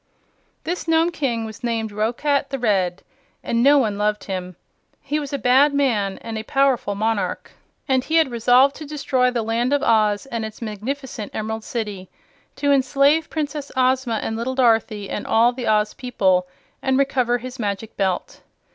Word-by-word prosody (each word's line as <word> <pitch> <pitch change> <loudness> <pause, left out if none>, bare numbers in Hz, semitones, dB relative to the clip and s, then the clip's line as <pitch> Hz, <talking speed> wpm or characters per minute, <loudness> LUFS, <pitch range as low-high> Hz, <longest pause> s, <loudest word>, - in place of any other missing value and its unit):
This 350 +1 -4
Nome 325 +1 +3
King 240 -8 -2
was 220 +2 -10
named 225 -2 -1
Roquat 245 +7 0
the 270 - -3
Red, 190 -7 0 0.4
and 235 0 0
no 285 +3 +6
one 215 -6 0
loved 210 0 0
him. 185 -2 -5 0.4
He 295 +2 -2
was 285 -2 -6
a 280 - -1
bad 275 +3 +4
man 215 -9 +1
and 225 -1 -4
a - - -5
powerful 265 -5 +1
monarch, 220 0 -2 0.4
and 260 -2 +2
he 315 - -2
had 320 -5 +4
resolved 245 +4 +4
to 310 - -8
destroy 265 -4 +1
the 240 -2 -2
Land 235 +4 0
of 285 - +1
Oz 215 -1 +2
and 230 -4 -4
its 220 -1 -7
magnificent 230 +1 -5
Emerald 220 +1 -3
City, 210 -6 -5 0.5
to 285 0 +1
enslave 280 +3 +3
Princess 295 -2 -4
Ozma 255 -2 +2
and 220 - -2
little 240 +3 -3
Dorothy 225 -5 +2
and 210 - -5
all 235 +2 +4
the 245 -1 -5
Oz 210 -1 +2
people, 190 -8 +1 0.3
and 265 0 +1
recover 255 -3 +1
his 255 +1 -9
Magic 210 0 -4
Belt. 190 -3 -2
240 Hz, 175 wpm, -22 LUFS, 215-275 Hz, 0.5 s, no